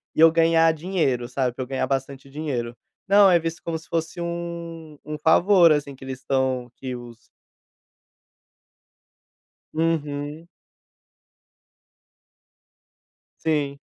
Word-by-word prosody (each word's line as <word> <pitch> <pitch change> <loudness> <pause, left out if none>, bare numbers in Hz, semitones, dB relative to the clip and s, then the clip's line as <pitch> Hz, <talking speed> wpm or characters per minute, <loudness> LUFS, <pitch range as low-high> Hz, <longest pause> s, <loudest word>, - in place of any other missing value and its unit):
e - - -4
eu 165 0 +8
ganhar 165 0 +4
dinheiro, 155 -8 -1
sabe, 125 -1 -1
pra 130 - -3
eu - - -9
ganhar 135 -1 -1
bastante 135 0 -3
dinheiro." 130 -5 -4 0.3
Não, 200 0 +7
é 170 - +5
visto 165 0 -4
como 165 -1 -2
se 160 - -14
fosse 165 +1 -2
um 170 -2 -6
um 150 +1 -5
favor, 170 +2 +5
assim, 145 -1 -2
que 135 - -14
eles 130 -1 -6
estão 130 -2 -1
que 130 -1 -6
os 120 -2 -10 2.5
Uhum. 155 0 -2 3.0
Sim. 145 -3 0
150 Hz, 115 wpm, -24 LUFS, 135-165 Hz, 3.0 s, eu